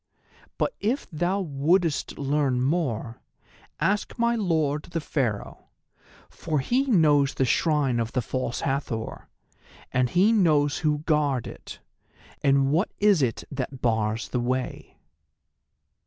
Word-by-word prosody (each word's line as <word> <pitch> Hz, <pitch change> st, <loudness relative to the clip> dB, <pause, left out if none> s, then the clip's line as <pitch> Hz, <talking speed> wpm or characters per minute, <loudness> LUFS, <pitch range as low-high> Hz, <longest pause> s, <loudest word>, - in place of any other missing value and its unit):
But -, -, 0 dB
if 240 Hz, +7 st, -1 dB
thou 175 Hz, +5 st, 0 dB
wouldest 160 Hz, +1 st, 0 dB
learn 140 Hz, -2 st, 0 dB
more, 130 Hz, -5 st, -1 dB, 0.6 s
ask 205 Hz, +1 st, 0 dB
my 235 Hz, 0 st, +2 dB
Lord 160 Hz, -8 st, 0 dB
the 170 Hz, -1 st, -4 dB
Pharaoh, 125 Hz, -9 st, -3 dB, 0.6 s
for 155 Hz, -2 st, -3 dB
he 250 Hz, -, +1 dB
knows 150 Hz, -, +3 dB
the 135 Hz, -, +1 dB
Shrine 140 Hz, -3 st, +1 dB
of 115 Hz, -1 st, -2 dB
the 125 Hz, -, +1 dB
False 130 Hz, 0 st, -3 dB
Hathor, 135 Hz, -5 st, -3 dB, 0.6 s
and 125 Hz, 0 st, +1 dB
he 190 Hz, -, +4 dB
knows 155 Hz, -9 st, +3 dB
who 150 Hz, -1 st, 0 dB
guard 145 Hz, -5 st, +1 dB
it, -, -, -10 dB, 0.6 s
and 135 Hz, 0 st, +3 dB
what 170 Hz, +7 st, +2 dB
is 205 Hz, -6 st, +4 dB
it 120 Hz, -4 st, -1 dB
that 135 Hz, -1 st, -5 dB
bars 110 Hz, -2 st, 0 dB
the 125 Hz, -, -1 dB
way." 130 Hz, +1 st, -3 dB
145 Hz, 125 wpm, -25 LUFS, 130-170 Hz, 0.6 s, he